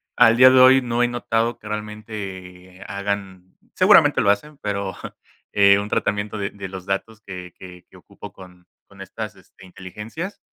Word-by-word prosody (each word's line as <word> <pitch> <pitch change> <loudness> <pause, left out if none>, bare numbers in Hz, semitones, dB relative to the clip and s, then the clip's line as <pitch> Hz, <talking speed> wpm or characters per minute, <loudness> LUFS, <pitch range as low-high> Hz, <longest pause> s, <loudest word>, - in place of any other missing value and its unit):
Al 115 +1 +5
día 130 +1 +8
de 130 - +5
hoy 130 +1 +7
no 120 0 -1
he 120 - +3
notado 120 -1 -1
que 105 - -13
realmente 100 -4 -8
hagan 100 -2 -5 0.2
seguramente - - +5
lo 100 - +2
hacen, 140 +9 -1
pero, 100 -2 -3 0.6
eh, 100 -1 +5
un 100 +1 -5
tratamiento 105 +1 -2
de 100 -1 -3
de 100 -1 -8
los 95 -1 -9
datos 105 +3 -4
que 90 -3 -9
que 90 -1 -13
que - - -17
ocupo - - -13
con 90 -1 -16 0.2
con - - -15
estas - - -7
este, 95 - -19
inteligencias. 105 - -8
100 Hz, 170 wpm, -21 LUFS, 95-115 Hz, 0.6 s, día